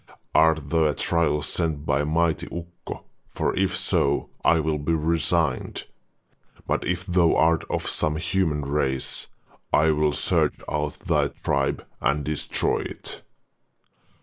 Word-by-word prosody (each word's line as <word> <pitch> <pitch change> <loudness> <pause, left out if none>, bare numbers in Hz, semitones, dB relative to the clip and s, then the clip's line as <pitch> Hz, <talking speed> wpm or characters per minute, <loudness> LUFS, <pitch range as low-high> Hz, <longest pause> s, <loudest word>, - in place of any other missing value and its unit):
Art 80 -3 +3
thou 80 -1 +3
a 75 -2 +1
trial 85 -3 +1
sent 80 0 -1
by 70 0 +1
mighty 80 +2 +1
Ukko, 85 0 -8 0.3
for - - 0
if - - +1
so 70 +1 +1
I 80 - +4
will 80 -1 0
be 70 +3 0
resigned, 80 -2 0 0.8
but - - 0
if 90 0 -2
thou 90 -3 +3
art 80 0 +3
of - - -2
some 75 0 0
human 80 -2 0
race, 70 -2 -1 0.4
I 80 +1 +4
will 75 -1 +2
search - - +2
out 75 -1 -1
thy - - 0
tribe - - -1 0.2
and 70 +1 +1
destroy 75 0 0
it. - - -6
80 Hz, 135 wpm, -25 LUFS, 75-85 Hz, 0.8 s, I